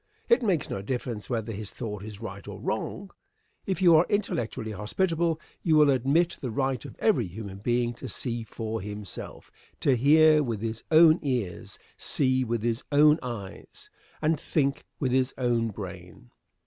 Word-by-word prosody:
It 470 - +5
makes 190 - +1
no 95 - -4
difference 120 -1 -4
whether 115 -2 -2
his 105 -1 -5
thought 105 -5 -5
is 105 -1 -9
right 100 -3 -8
or - - -7
wrong. 195 0 -4 0.6
If 190 0 -1
you 170 -2 +7
are 160 +3 +5
intellectually 120 - -1
hospitable 165 - 0 0.2
you 160 -3 +3
will 150 -2 +6
admit 140 +7 +2
the 130 - -4
right 130 0 -1
of - - -9
every 190 - +2
human 100 +1 -8
being 120 +2 0
to - - -5
see 120 -2 -3
for 110 -1 -5
himself; 105 -1 -8 0.3
to 135 - +3
hear 155 +4 +6
with 115 -7 -2
his 115 0 -4
own 160 +1 +7
ears, 125 - -3 0.2
see 130 -2 +1
with 115 -2 -2
his 115 0 -1
own 150 +2 +6
eyes, 120 - -8 0.3
and 155 -1 +2
think 140 -3 0
with 130 -3 0
his 130 +1 +1
own 120 -2 +1
brain. 90 - -9
125 Hz, 165 wpm, -27 LUFS, 110-155 Hz, 0.6 s, you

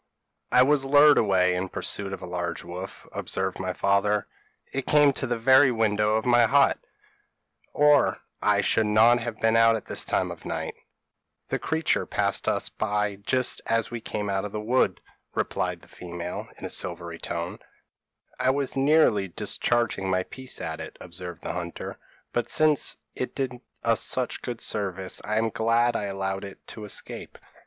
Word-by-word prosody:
p> - - +2
"'I 125 - +8
was 140 0 +3
lured 145 +2 +6
away 95 -3 +3
in 90 +1 -2
pursuit 100 +1 -3
of 95 - -6
a - - -4
large 90 -1 -3
white - - -10
wolf,' 95 +2 -8
observed 95 -1 -2
my 95 -1 -2
father; 100 +2 +1 0.5
'it 135 -1 -3
came 145 -2 +5
to 130 - -3
the 120 0 -1
very 130 +3 +6
window 105 -2 +2
of 110 - 0
my 120 -1 +5
hut, 140 +3 +4 0.9
or 150 -1 +4 0.2
I - - +3
should 110 -1 +2
not 110 +3 +5
have 115 -2 -5
been 115 0 +3
out 115 0 +6
at 110 - -5
this - - -1
time - - 0
of - - -10
night.' - - -4 0.8
"'The - - -1
creature 160 0 0
passed - - 0 0.3
by 105 -1 0
us 100 - -14
just 130 -1 +1
as 115 0 +1
we 120 -1 -5
came 105 -1 -3
out 95 -1 -1
of 105 - -5
the 105 - -3
wood,' 120 +5 +1 0.5
said - - -1
the - - -17
female, 90 0 -6
in - - -7
a - - -4
silvery 85 -2 -4
tone. 85 +1 -4 0.8
"'I 130 +1 +2
was 135 0 0
nearly 135 -8 +4
discharging 100 +2 -1
my 95 0 +1
piece 130 +6 -6
at - - -4
it,' - - -8
observed 90 0 -8
the - - -3
hunter; 85 -1 -6 0.3
'but 120 - -1
since 155 -2 +2 0.2
it 125 - -4
did 135 -2 -2 0.3
us - - +2
such - - -1
good 120 -2 -5
service, 95 -3 -3
I 105 +1 -1
am 110 0 +1
glad 115 +2 +2
I 105 - -1
allowed 95 0 -3
it 100 -1 -10
to 110 - -7
escape.' 105 - -5
110 Hz, 180 wpm, -26 LUFS, 95-125 Hz, 0.9 s, I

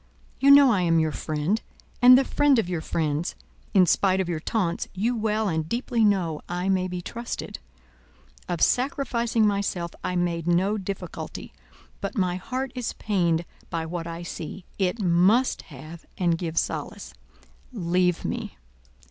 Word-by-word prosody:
You 275 - +4
know 280 -2 +8
I 200 -5 +2
am 165 -2 +3
your 160 -1 +1
friend, 155 +9 -1 0.4
and 250 +1 +9
the 270 - +4
friend 290 -1 +3
of 225 - +1
your 175 -3 -2
friends; 155 +1 -2 0.4
in 185 -2 +7
spite 190 +2 +2
of 190 - 0
your 170 -3 -2
taunts, 175 0 -1
you 230 +6 0
well 220 -1 0
and 160 -3 -2
deeply 235 -1 0
know 180 -7 +1
I 180 +2 -2
may 185 -1 +1
be 180 -1 -5
trusted. 235 +5 -6 0.9
Of 170 - -2
sacrificing 240 -4 +1
myself 200 -4 -1
I 180 - -2
made 170 -2 -1
no 190 +5 +2
difficulty 195 0 -6 0.5
but - - -5
my 180 -2 +1
heart 255 +7 -4
is 250 -2 -3
pained 175 -5 0 0.2
by 165 -1 -2
what 170 0 -5
I 170 +1 -6
see; 170 +2 -7
it 190 +4 0
must 195 +7 +3
have 155 +3 -11
and 175 -2 +2
give 165 -1 -5
solace. - - -3 0.6
_Leave 180 -4 0
me! - - -4
185 Hz, 155 wpm, -25 LUFS, 170-220 Hz, 0.9 s, and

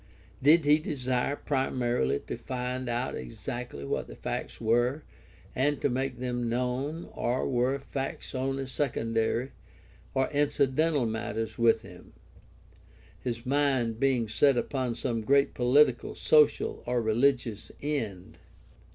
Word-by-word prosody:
Did 150 +3 +5
he 150 +1 +5
desire 130 -2 -1
primarily 125 - 0
to - - -5
find 125 0 -4
out 120 +2 -1
exactly 70 - -6
what - - -2
the - - -10
facts - - -5
were 120 +6 +1 0.5
and 145 +3 +1
to 145 - +1
make 130 0 -2
them 120 -1 -2
known, 125 +7 -2
or 120 +2 -1
were 130 +1 +1
facts 135 0 -5
only 135 +1 -1
secondary 120 -2 -1 0.6
or 130 0 +2
incidental 145 0 +2
matters 110 0 -3
with 115 -1 +4
him, 90 -4 -13 1.1
his 120 -1 -4
mind 130 -5 +1
being 130 -4 +2
set 135 +4 +3
upon 125 -1 -1
some 115 -2 -2
great 140 +5 +3
political, 125 0 +3
social, 150 -2 +3
or 125 0 +1
religious 115 -1 +1
end 110 -12 -3
125 Hz, 125 wpm, -29 LUFS, 115-140 Hz, 1.1 s, Did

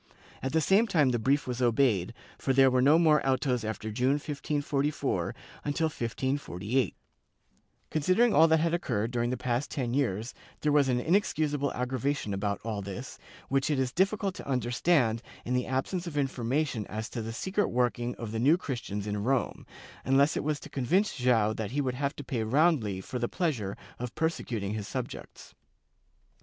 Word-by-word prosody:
At 130 - -2
the 160 - +2
same 200 +8 +4
time 155 -9 +3
the 120 -1 0
brief 140 +6 +2
was 125 0 -3
obeyed, 115 -6 +2 0.2
for 135 - 0
there 135 0 +6
were 125 0 +3
no 145 +5 +6
more 155 -3 +4
autos 130 -3 +1
after 110 0 -4
June, 125 +5 +2
1544, 145 0 -1 0.3
until 155 +2 0
1548/ 120 - -1 1.0
Considering 185 +10 +3
all 160 +2 +7
that 160 0 +4
had 165 +1 +1
occurred 115 -10 -1
during 120 -1 0
the 125 - -1
past 125 +2 -1
ten 125 -4 -2
years, 120 -4 -1 0.3
there 150 - +2
was 145 -2 +4
an 125 -1 +2
inexcusable 150 -3 +1
aggravation 125 -2 -1
about 100 +1 -1
all 110 -2 -3
this, 100 +6 -7 0.3
which 135 +1 +1
it 150 - +1
is 130 -2 0
difficult 195 +2 +1
to - - -9
understand 120 -1 +2 0.2
in 125 - -1
the 125 0 0
absence 170 +7 -2
of 150 -3 -5
information 135 -3 -1
as 110 +2 -4
to 115 - -5
the 110 +1 -5
secret 190 - -1
work 125 0 +1
ing 120 0 -3
of 115 -3 -6
the 110 - -2
New 145 +8 +5
Christians 115 - -4
in 105 -1 -2
Rome, 130 0 -1 0.4
unless 140 +3 +3
it - - -1
was 150 0 -1
to - - -10
convince 180 - +1
Joao 120 -5 +2
that 110 -2 -4
he 145 - 0
would 130 -3 0
have 140 +2 -2
to 145 - -7
pay 125 -4 -2
roundly 115 - +2
for 125 +6 -5
the 120 - -1
pleasure 125 - -2 0.2
of 125 -1 -5
persecuting 115 -11 -2
his 105 -2 -4
subjects. - - -7
130 Hz, 180 wpm, -29 LUFS, 115-150 Hz, 1.0 s, all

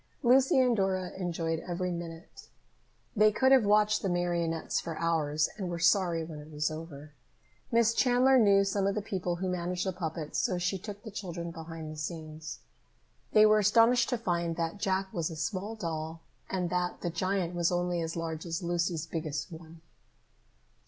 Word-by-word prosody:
Lucy 260 +2 +5
and 250 -2 +4
Dora 190 -3 0
enjoyed 165 -3 -2
every 180 +1 -3
minute. 170 -1 -8 0.7
They 215 0 +5
could 260 +5 +3
have 265 -3 +7
watched 210 +1 +3
the 195 - -1
marionettes 170 -2 0
for 165 -1 -5
hours 155 -2 +1
and 190 -4 -3
were 170 - -3
sorry 175 -1 +3
when 160 -2 -8
it 150 +1 -11
was 150 0 -1
over. 155 -2 -9 0.6
Miss 230 -1 +4
Chandler 255 +2 +4
knew 200 -3 +5
some 195 0 0
of 200 - 0
the 210 - -1
people 180 -4 -2
who 185 +2 -3
managed 180 0 -2
the 190 - -1
puppets, 160 -3 -4
so 180 - 0
she 180 +2 -1
took 205 +1 -8
the 220 - -8
children 170 -4 -5
behind 165 -1 -7
the 155 - -9
scenes. 155 -1 -6 0.7
They 215 0 +7
were 215 0 +5
astonished 230 +3 +4
to 245 - 0
find 170 -6 -1
that 165 +4 -3
Jack 190 -1 -1
was 165 -3 -1
a 165 - -7
small 200 +7 -3
doll, 165 -4 -5 0.3
and 180 -2 -2
that 180 0 -1
the 175 - -2
giant 185 +1 -1
was 170 0 +1
only 175 -1 0
as 165 0 -3
large 160 -1 -4
as 170 +2 -4
Lucy's 170 -1 -1
biggest 155 -3 -4
one. 160 0 -11
175 Hz, 180 wpm, -30 LUFS, 165-200 Hz, 0.7 s, have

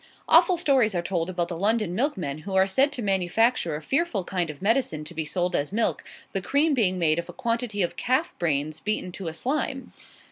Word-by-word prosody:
Awful 365 -2 +6
stories 265 - +2
are 175 - +1
told 175 -1 -1
about 175 -2 -1
the 175 - -4
London 205 +1 0
milkmen, 180 - -1
who 190 +4 -5
are 190 0 +5
said 265 +9 +2
to 245 - -4
manufacture 195 -1 +1
a 155 - -6
fearful 270 - 0
kind 175 -2 -2
of 150 -2 -8
medicine 205 - 0
to 155 - -9
be 160 -1 -3
sold 180 +2 -1
as 145 +3 -1
milk, 225 +3 0 0.3
the 195 - -1
cream 285 - +2
being 195 -8 +2
made 165 -2 +2
of 170 - -6
a - - -7
quantity 230 -4 -1
of 175 - -2
calf's 260 +8 0
brain 155 -2 0
beaten 210 -3 -2
to 185 0 -7
a 160 - -3
slime. 265 - -3
195 Hz, 215 wpm, -25 LUFS, 170-245 Hz, 0.3 s, Awful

